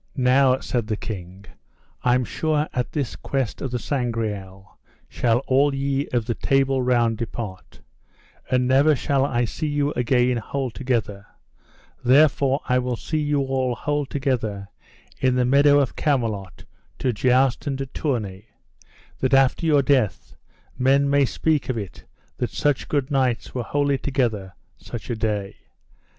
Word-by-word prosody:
Now, 130 0 +4
said 120 -4 -2
the 110 -2 -2
king, 95 -2 -7 0.6
I 125 0 +3
am 125 -1 +1
sure 155 +4 -1
at 125 -1 -2
this 140 -6 -3
quest 135 -5 -3
of 135 - -2
the 125 - -2
Sangreal 110 -7 -4 0.3
shall 120 +1 0
all 140 +1 +3
ye 140 +1 -1
of 120 -3 -1
the 120 - -1
Table 135 +1 +1
Round 120 -3 +1
depart, 110 -5 -7 0.7
and 125 -1 +2
never 140 +4 +4
shall 135 +1 +1
I 120 -3 +1
see 155 +7 -4
you 145 0 0
again 125 0 +2
whole 130 +2 -3
together; 110 -5 -2 0.8
therefore 140 +1 +4
I 125 0 +3
will 125 -1 -2
see 155 +6 -3
you 145 -1 +1
all 130 -2 -1
whole 145 +2 -2
together 110 -8 -2 0.5
in 130 -1 +2
the 125 -1 +2
meadow 140 +2 +5
of 135 -4 0
Camelot 110 - -2 0.3
to 125 - 0
joust 130 +5 +2
and 135 -2 -1
to 135 - -3
tourney, 115 -8 -3 0.7
that 130 +1 +2
after 135 +5 +3
your 145 -3 +4
death 130 -8 0 0.4
men 140 +2 +3
may 140 -1 +4
speak 155 +2 0
of 125 - -1
it 100 -4 -7 0.3
that - - -2
such 145 -3 -1
good 145 -1 -1
knights 130 -4 0
were 125 - -2
wholly 140 +3 0
together 110 -9 -1 0.2
such 120 +1 -7
a - - -1
day. 105 -3 -2
130 Hz, 155 wpm, -23 LUFS, 115-140 Hz, 0.8 s, meadow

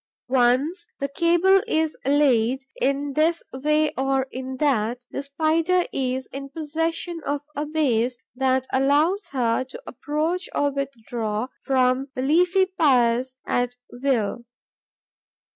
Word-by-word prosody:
Once 265 +8 +2
the 280 - -1
cable 345 +6 +3
is 315 -6 0
laid, 265 -3 +3 0.2
in 280 +1 0
this 325 +3 +2
way 300 +3 +1
or 270 0 +1
in 260 0 -5
that, 245 -4 0
the - - -3
Spider 320 +5 +1
is 260 -1 -2
in 275 +1 -6
possession 325 +3 -3
of 285 0 -2
a 295 +1 -2
base 255 -6 +1 0.2
that 260 0 +1
allows 295 +9 +2
her 245 -3 +1
to 265 - -10
approach 320 +5 -2
or 285 0 +2
withdraw 240 -4 -3
from 260 0 +2
the 255 - -2
leafy 360 +6 +3
piers 255 -8 +2
at 245 0 0 0.2
will. 245 -3 -1
275 Hz, 125 wpm, -24 LUFS, 255-315 Hz, 0.2 s, cable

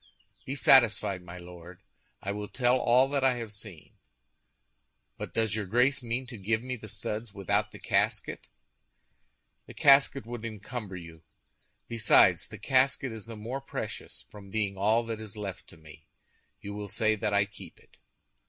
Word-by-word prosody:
"Be 135 - -2
satisfied, 115 -8 +5
my 90 0 -10
Lord, 90 +1 -12 0.4
I 100 - -2
will 105 0 -4
tell 125 +1 +2
all 125 +2 +4
that 140 -1 0
I 130 -1 +4
have 115 -3 -5
seen. 100 -6 -10 1.2
But - - -6
does 110 -2 +1
your 105 -3 -3
Grace 125 +6 +3
mean 120 +2 -3
to 120 -4 -9
give 110 +4 0
me 130 0 -3
the 110 -2 -10
studs 105 +1 -5
without 100 -3 0
the - - -11
casket?" - - 0 1.2
"The - - -11
casket 135 -1 +5
would 120 -1 -6
encumber 110 -2 -6
you. 85 -2 -10 0.7
Besides, 115 -3 +4
the - - -9
casket 135 0 +2
is 110 -1 -8
the 115 -1 -8
more 120 +6 -5
precious 135 - -6
from 100 -2 -12
being 100 -1 -1
all 110 +4 +2
that 115 -1 -4
is 110 -1 -8
left 100 -3 -6
to - - -14
me. 80 0 -15 0.5
You 100 - -7
will 105 0 -5
say 110 +2 +1
that 105 0 -1
I 100 0 +4
keep 100 -1 -13
it." - - -25
110 Hz, 170 wpm, -29 LUFS, 100-120 Hz, 1.2 s, satisfied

